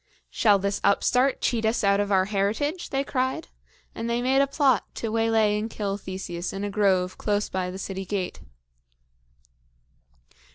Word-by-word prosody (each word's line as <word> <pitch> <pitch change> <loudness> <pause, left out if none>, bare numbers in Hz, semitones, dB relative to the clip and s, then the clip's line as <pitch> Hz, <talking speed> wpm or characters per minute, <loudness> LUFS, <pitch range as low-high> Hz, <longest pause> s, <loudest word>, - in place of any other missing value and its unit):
"Shall 210 -3 +4
this 200 +1 -2
upstart 250 +6 +2
cheat 230 -2 0
us 220 +1 +1
out 200 0 +3
of 205 0 -1
our 190 -1 +4
heritage?" 215 - -1
they 275 0 0
cried; 260 +3 -2 0.4
and 230 +1 -4
they 235 +1 +1
made 265 +2 +3
a 275 - +3
plot 275 -4 +2
to 225 - -3
waylay 225 -2 +2
and 220 +2 -3
kill 200 -3 -3
Theseus 185 -3 -5
in 195 +1 -4
a 205 - -2
grove 190 -3 +1
close 205 -1 0
by 185 -1 -2
the 185 - -6
city 190 0 -5
gate. 190 -1 -3
210 Hz, 165 wpm, -25 LUFS, 195-240 Hz, 0.4 s, Shall